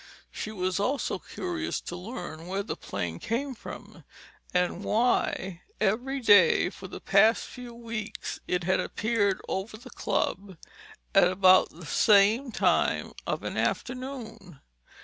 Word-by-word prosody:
She 215 Hz, -, -5 dB
was 185 Hz, -2 st, -1 dB
also 260 Hz, +8 st, -1 dB
curious 345 Hz, -3 st, -4 dB
to 175 Hz, -, -6 dB
learn 180 Hz, -4 st, -7 dB
where 195 Hz, +2 st, -2 dB
the -, -, -4 dB
plane 85 Hz, -1 st, -5 dB
came 265 Hz, +5 st, -2 dB
from; 235 Hz, -, -10 dB, 0.5 s
and 180 Hz, +1 st, 0 dB
why 200 Hz, -5 st, 0 dB, 0.2 s
every 245 Hz, +7 st, 0 dB
day 195 Hz, -5 st, +6 dB
for 190 Hz, -, -10 dB
the -, -, -8 dB
past 215 Hz, +4 st, +4 dB
few 245 Hz, -2 st, -10 dB
weeks 230 Hz, -2 st, -5 dB
it 180 Hz, -1 st, 0 dB
had 185 Hz, +2 st, +2 dB
appeared 205 Hz, -3 st, 0 dB
over 205 Hz, +3 st, -3 dB
the 250 Hz, +2 st, -13 dB
Club 190 Hz, -1 st, -2 dB, 0.6 s
at -, -, +6 dB
about 185 Hz, 0 st, +5 dB
this 160 Hz, -2 st, -10 dB
same 215 Hz, +5 st, +4 dB
time -, -, +1 dB
of -, -, -2 dB
an -, -, -4 dB
afternoon. 240 Hz, -, -4 dB
205 Hz, 135 wpm, -28 LUFS, 185-235 Hz, 0.6 s, day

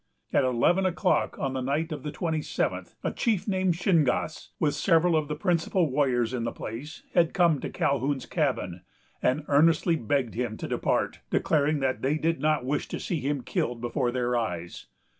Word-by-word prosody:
At -, -, +4 dB
eleven 130 Hz, +9 st, +3 dB
o'clock 185 Hz, +1 st, +1 dB
on 135 Hz, -1 st, -2 dB
the 130 Hz, -, -2 dB
night 150 Hz, +6 st, -1 dB
of 155 Hz, -, -4 dB
the 150 Hz, -, -5 dB
twenty 160 Hz, 0 st, -2 dB
seventh, -, -, -2 dB
a -, -, 0 dB
chief 225 Hz, -6 st, 0 dB
named 185 Hz, -3 st, +1 dB
Shingas, 160 Hz, -4 st, +1 dB
with 150 Hz, -2 st, +2 dB
several 170 Hz, -1 st, +3 dB
of 155 Hz, -2 st, +1 dB
the 150 Hz, -, -3 dB
principal 170 Hz, -1 st, +1 dB
warriors 130 Hz, -4 st, +1 dB
in 120 Hz, -2 st, -2 dB
the 115 Hz, -, -1 dB
place, 135 Hz, +8 st, -7 dB
had 170 Hz, -2 st, +3 dB
come 170 Hz, -5 st, +4 dB
to -, -, -4 dB
Calhoun's 140 Hz, 0 st, 0 dB
cabin, 125 Hz, -, -1 dB, 0.4 s
and 130 Hz, +4 st, +1 dB
earnestly 165 Hz, +3 st, +4 dB
begged 130 Hz, -3 st, -1 dB
him 115 Hz, -2 st, -3 dB
to -, -, -5 dB
depart, -, -, 0 dB
declaring 150 Hz, -1 st, +1 dB
that 130 Hz, -1 st, 0 dB
they 140 Hz, +4 st, +1 dB
did 165 Hz, -1 st, 0 dB
not 150 Hz, -3 st, +1 dB
wish 145 Hz, +3 st, -1 dB
to -, -, -5 dB
see 170 Hz, -, -2 dB
him 140 Hz, -1 st, -2 dB
killed 120 Hz, 0 st, -2 dB
before 120 Hz, +2 st, -1 dB
their 125 Hz, 0 st, 0 dB
eyes. 90 Hz, -8 st, -3 dB
145 Hz, 185 wpm, -27 LUFS, 125-165 Hz, 0.4 s, At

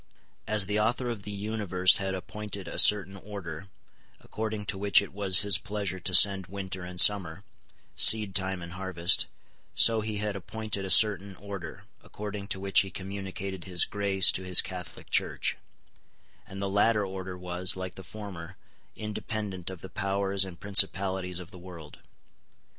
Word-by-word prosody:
As 105 Hz, -2 st, 0 dB
the 105 Hz, +2 st, -2 dB
Author 120 Hz, +3 st, -1 dB
of 110 Hz, -4 st, -7 dB
the 105 Hz, -, -8 dB
universe 100 Hz, -3 st, +1 dB
had 95 Hz, -1 st, -3 dB
appointed 100 Hz, +1 st, -8 dB
a -, -, -3 dB
certain 100 Hz, -2 st, +5 dB
order, 95 Hz, -4 st, -9 dB, 0.5 s
according 110 Hz, -1 st, -6 dB
to 100 Hz, -, -3 dB
which 100 Hz, 0 st, +5 dB
it 100 Hz, -, -6 dB
was 100 Hz, -2 st, +3 dB
His 100 Hz, -1 st, +2 dB
pleasure 100 Hz, -3 st, -5 dB
to 90 Hz, +1 st, -5 dB
send 95 Hz, -1 st, +6 dB
winter 95 Hz, -1 st, -6 dB
and 90 Hz, 0 st, -7 dB
summer, 95 Hz, -3 st, +5 dB, 0.5 s
seedtime 95 Hz, -4 st, +4 dB
and 85 Hz, -, -9 dB
harvest, 90 Hz, -1 st, 0 dB, 0.5 s
so 115 Hz, -1 st, +6 dB
He 105 Hz, 0 st, -5 dB
had 105 Hz, 0 st, -3 dB
appointed 100 Hz, +1 st, -5 dB
a -, -, -6 dB
certain 100 Hz, 0 st, +4 dB
order, 100 Hz, 0 st, -9 dB, 0.2 s
according 105 Hz, -1 st, -8 dB
to 95 Hz, -, -2 dB
which 95 Hz, -1 st, +3 dB
He 95 Hz, -, 0 dB
communicated 95 Hz, -1 st, -7 dB
His 90 Hz, -2 st, 0 dB
grace 100 Hz, -2 st, +3 dB
to -, -, -4 dB
His 90 Hz, -1 st, +6 dB
Catholic 90 Hz, -3 st, -6 dB
Church; -, -, -1 dB, 0.9 s
and 95 Hz, -1 st, -10 dB
the 100 Hz, -, -3 dB
latter 105 Hz, +2 st, +1 dB
order 95 Hz, -1 st, -7 dB
was, 90 Hz, 0 st, -1 dB
like 95 Hz, -1 st, -7 dB
the -, -, -10 dB
former, 95 Hz, -4 st, -10 dB, 0.4 s
independent 105 Hz, -3 st, -6 dB
of 95 Hz, -2 st, -10 dB
the -, -, -9 dB
powers 100 Hz, 0 st, -1 dB
and 95 Hz, -2 st, -10 dB
principalities 95 Hz, -2 st, +2 dB
of 90 Hz, 0 st, -7 dB
the 90 Hz, -, -13 dB
world. 85 Hz, -4 st, -12 dB
95 Hz, 160 wpm, -27 LUFS, 95-105 Hz, 0.9 s, send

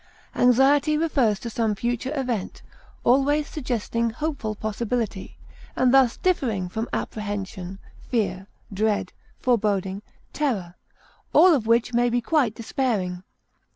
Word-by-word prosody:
Anxiety 275 Hz, +5 st, +4 dB
refers 270 Hz, -10 st, +2 dB
to 235 Hz, -, -5 dB
some 220 Hz, -2 st, 0 dB
future 240 Hz, +4 st, -2 dB
event, 240 Hz, -7 st, -3 dB, 0.4 s
always 285 Hz, +4 st, +3 dB
suggesting 235 Hz, -4 st, -2 dB
hopeful 240 Hz, -4 st, -3 dB
possibility, 215 Hz, -1 st, -3 dB, 0.4 s
and 255 Hz, 0 st, +3 dB
thus 265 Hz, -3 st, +5 dB
differing 230 Hz, -, 0 dB
from 220 Hz, +5 st, -4 dB
apprehension, 195 Hz, -3 st, -4 dB, 0.3 s
fear, 195 Hz, -5 st, -1 dB, 0.3 s
dread, 205 Hz, -2 st, 0 dB, 0.3 s
foreboding, 200 Hz, -5 st, 0 dB, 0.3 s
terror, 215 Hz, -13 st, -1 dB, 0.6 s
all 365 Hz, -1 st, +7 dB
of 240 Hz, -7 st, 0 dB
which 235 Hz, +1 st, +2 dB
may 240 Hz, +1 st, +3 dB
be 240 Hz, +1 st, +1 dB
quite 245 Hz, -3 st, +1 dB
despairing. 215 Hz, -7 st, -2 dB
230 Hz, 115 wpm, -24 LUFS, 205-265 Hz, 0.6 s, all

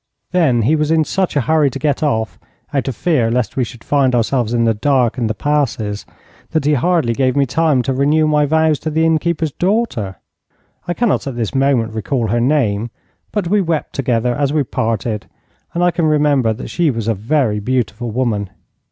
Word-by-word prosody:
Then 145 Hz, -11 st, +2 dB
he 145 Hz, +9 st, +3 dB
was 150 Hz, -1 st, 0 dB
in 160 Hz, -1 st, +3 dB
such 185 Hz, +2 st, -1 dB
a 145 Hz, -, +3 dB
hurry 155 Hz, +1 st, +2 dB
to 135 Hz, -, -6 dB
get 145 Hz, 0 st, -1 dB
off, 110 Hz, -, -1 dB, 0.3 s
out 140 Hz, -2 st, -1 dB
of 135 Hz, -, -2 dB
fear 125 Hz, -2 st, +1 dB
lest 125 Hz, 0 st, -1 dB
we 130 Hz, -, +1 dB
should 120 Hz, 0 st, -9 dB
find 135 Hz, -3 st, +2 dB
ourselves 120 Hz, 0 st, 0 dB
in 120 Hz, -1 st, +1 dB
the 115 Hz, -1 st, +3 dB
dark 125 Hz, +1 st, +1 dB
in 115 Hz, -, 0 dB
the 110 Hz, -, -2 dB
passes, 120 Hz, -7 st, -1 dB, 0.4 s
that 155 Hz, -3 st, -1 dB
he 150 Hz, -, +3 dB
hardly 150 Hz, -3 st, +1 dB
gave 130 Hz, +1 st, +1 dB
me 140 Hz, -1 st, +3 dB
time 145 Hz, 0 st, +1 dB
to 135 Hz, -, -1 dB
renew 145 Hz, +4 st, +2 dB
my 150 Hz, -1 st, +2 dB
vows 160 Hz, 0 st, +2 dB
to 155 Hz, -, -3 dB
the 160 Hz, +1 st, +1 dB
innkeeper's 160 Hz, -1 st, 0 dB
daughter. 180 Hz, -, -1 dB, 0.7 s
I 175 Hz, -, -1 dB
cannot 235 Hz, -10 st, 0 dB
at 135 Hz, -, -4 dB
this 115 Hz, -3 st, -3 dB
moment 135 Hz, -5 st, +1 dB
recall 115 Hz, +1 st, -2 dB
her 120 Hz, +2 st, +1 dB
name, 120 Hz, -5 st, +1 dB, 0.4 s
but 205 Hz, -5 st, -1 dB
we 205 Hz, +3 st, +2 dB
wept 165 Hz, -4 st, -2 dB
together 125 Hz, -2 st, 0 dB
as 140 Hz, +2 st, 0 dB
we 150 Hz, -1 st, +1 dB
parted, 110 Hz, -3 st, -2 dB, 0.4 s
and 175 Hz, -, -1 dB
I 175 Hz, -, +4 dB
can 170 Hz, -1 st, 0 dB
remember 145 Hz, -6 st, +2 dB
that 110 Hz, -, -6 dB
she 170 Hz, -2 st, +1 dB
was 115 Hz, -4 st, -3 dB
a 115 Hz, -, +2 dB
very 110 Hz, +1 st, 0 dB
beautiful 120 Hz, 0 st, -2 dB
woman. 110 Hz, -4 st, -1 dB
135 Hz, 205 wpm, -17 LUFS, 115-155 Hz, 0.7 s, I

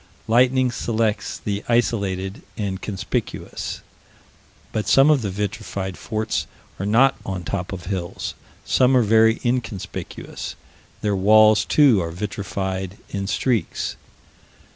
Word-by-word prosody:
Lightning 125 Hz, +2 st, +4 dB
selects 110 Hz, -3 st, -1 dB
the 100 Hz, 0 st, -3 dB
isolated 100 Hz, -5 st, 0 dB, 0.2 s
and 100 Hz, -3 st, -3 dB
conspicuous. 95 Hz, -3 st, -4 dB, 0.9 s
But 110 Hz, -, -2 dB
some 135 Hz, +3 st, +6 dB
of 145 Hz, -4 st, +3 dB
the 105 Hz, -, -2 dB
vitrified 95 Hz, -1 st, -3 dB
forts 110 Hz, -8 st, -2 dB, 0.3 s
are 100 Hz, -, -2 dB
not 130 Hz, +6 st, +4 dB
upon 95 Hz, -3 st, -5 dB
tops 90 Hz, +1 st, -3 dB
of 95 Hz, -2 st, -6 dB
hills: 90 Hz, -2 st, -4 dB, 0.3 s
some 130 Hz, 0 st, +4 dB
are 125 Hz, -, +4 dB
very 110 Hz, +1 st, +4 dB
inconspicuous: 120 Hz, -6 st, -4 dB, 0.5 s
their 105 Hz, -1 st, +1 dB
walls 110 Hz, +2 st, +6 dB
too 135 Hz, -10 st, +5 dB
are 85 Hz, -, -3 dB
vitrified 95 Hz, 0 st, -4 dB
in 100 Hz, -1 st, -3 dB
streaks. 110 Hz, -2 st, -1 dB
105 Hz, 120 wpm, -22 LUFS, 95-115 Hz, 0.9 s, some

